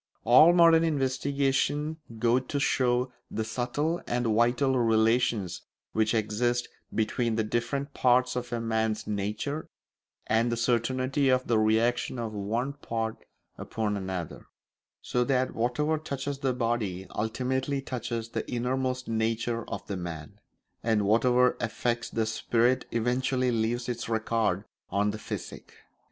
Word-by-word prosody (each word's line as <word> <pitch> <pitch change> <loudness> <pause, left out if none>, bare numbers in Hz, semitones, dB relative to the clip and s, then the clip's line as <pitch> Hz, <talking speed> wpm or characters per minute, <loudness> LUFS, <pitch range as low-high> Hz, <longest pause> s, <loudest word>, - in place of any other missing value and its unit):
All 130 +8 +8
modern 165 -2 +6
investigation 140 +1 0 0.2
goes 120 +2 +3
to 145 - -1
show 125 -2 +1 0.2
the 110 - -2
subtle 125 +9 -1
and 120 0 0
vital 120 +4 +2
relations 110 -4 +2 0.3
which 110 +1 +1
exist 120 +3 0 0.2
between 110 +1 0
the 110 - +1
different 120 +6 -2
parts 125 0 +3
of 125 0 -4
a 120 - -1
man's 110 -1 -1
nature, 105 +9 -3 0.6
and 115 +2 +2
the 120 - -1
certainty 130 +4 +1
of 130 0 +2
the 115 -2 +2
reaction 115 +4 +1
of 115 -2 -4
one 115 +7 -2
part 115 -5 -4 0.3
upon 105 -2 -2
another; 95 -4 -5 0.6
so 125 - +1
that 130 0 +1
whatever 150 +7 0
touches 140 -2 -4
the 135 -1 +1
body 115 -6 -1
ultimately 130 +5 -1
touches 120 -3 -4
the - - -4
innermost 130 +1 -1
nature 115 +1 -1
of - - -5
the 100 - -4
man, 80 -4 -7 0.4
and 110 -3 +1
whatever 125 +4 +4
affects 120 0 -1
the 115 -1 0
spirit 120 +3 +1
eventually 125 +2 0
leaves 115 +1 -1
its 120 -2 -4
record 110 -3 0 0.2
on 100 +2 +1
the 105 - -7
physique. - - -7
120 Hz, 135 wpm, -28 LUFS, 110-130 Hz, 0.6 s, All